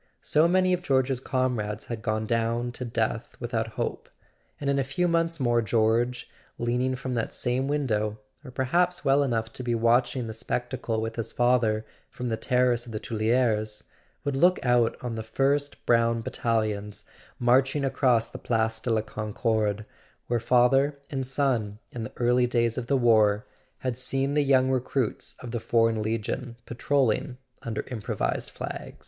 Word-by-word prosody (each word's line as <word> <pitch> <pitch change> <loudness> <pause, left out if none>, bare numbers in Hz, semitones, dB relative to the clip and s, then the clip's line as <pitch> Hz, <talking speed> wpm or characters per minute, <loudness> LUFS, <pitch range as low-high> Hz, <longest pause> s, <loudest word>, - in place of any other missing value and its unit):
So 155 +2 +4
many 185 +1 +3
of 180 - 0
George's 130 -4 +1
comrades 125 -6 -1
had 115 -2 -5
gone 110 +1 -1
down 115 +2 0
to 125 - -6
death 115 -1 -2
without 115 -2 -2
hope; - - -3 0.5
and 145 - -4
in 140 0 +2
a - - +2
few 135 +7 0
months 165 -1 +1
more 120 -2 +2
George, 115 +3 +1 0.3
leaning 125 +2 0
from 130 0 -4
that 115 -2 -2
same 125 +2 -1
window—or 110 -3 -2
perhaps 175 +8 0
well 140 +1 +4
enough 115 -4 -1
to - - -5
be 120 -2 0
watching 120 +2 +2
the 110 - -5
spectacle 120 0 -3
with 115 +1 -4
his 115 - -3
father 120 -3 +2 0.2
from 125 -1 -5
the 110 - 0
terrace 125 +1 +1
of - - -8
the 110 - -2
Tuileries—would 110 +3 -1
look 180 +6 +4
out 120 -2 +3
on 120 -2 -3
the 110 - -4
first 140 +5 -1
brown 115 -1 +3
battalions 110 -4 -2 0.3
marching 130 +3 +3
across 125 -4 +2
the - - -9
Place 110 -1 0
de 120 - -4
la 110 -1 +2
Concorde, 110 -1 -1 0.4
where 120 0 0
father 130 +4 +3
and 135 -2 -2
son, 125 -7 0
in 115 -2 -5
the - - -9
early 125 +1 +3
days 120 -2 +1
of 120 -2 -4
the 140 - +3
war, 110 -4 +4 0.3
had 130 -2 -3
seen 135 +3 -1
the 150 - +3
young 130 -1 +3
recruits 130 -1 -1
of 120 - -7
the 120 - -2
Foreign 115 -1 +2
Legion 115 +2 -3
patrolling 125 0 0 0.2
under 110 -2 -3
improvised 110 -5 -2
flags. - - -7
120 Hz, 165 wpm, -27 LUFS, 110-130 Hz, 0.5 s, So